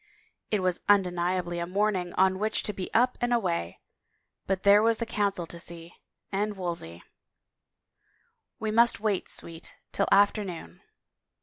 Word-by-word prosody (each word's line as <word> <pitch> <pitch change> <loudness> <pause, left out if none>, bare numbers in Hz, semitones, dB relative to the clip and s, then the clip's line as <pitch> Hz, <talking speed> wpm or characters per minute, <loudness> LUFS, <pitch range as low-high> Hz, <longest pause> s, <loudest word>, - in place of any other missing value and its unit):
It 210 -3 0
was 185 -1 0
undeniably 180 -2 +1
a 170 - -3
morning 190 -2 0
on 190 0 +3
which 215 +1 0
to 210 - -3
be 185 - -6
up 250 +2 +2
and 240 0 0
away 85 - -1 0.3
— - - -48
but 190 -1 -1
there 200 +1 +7
was 225 0 +3
the 230 - -2
Council 200 -5 -1
to 170 +1 -9
see 170 0 -5 0.2
— - - -53
and 205 +1 -1
Wolsey 170 - -3 0.6
— - - -53
" - - -44
We 220 -1 -2
must 235 0 +4
wait, 205 -3 -1
Sweet, 165 0 -4 0.2
till 200 - 0
afternoon." 195 - +1
190 Hz, 165 wpm, -27 LUFS, 175-210 Hz, 0.6 s, there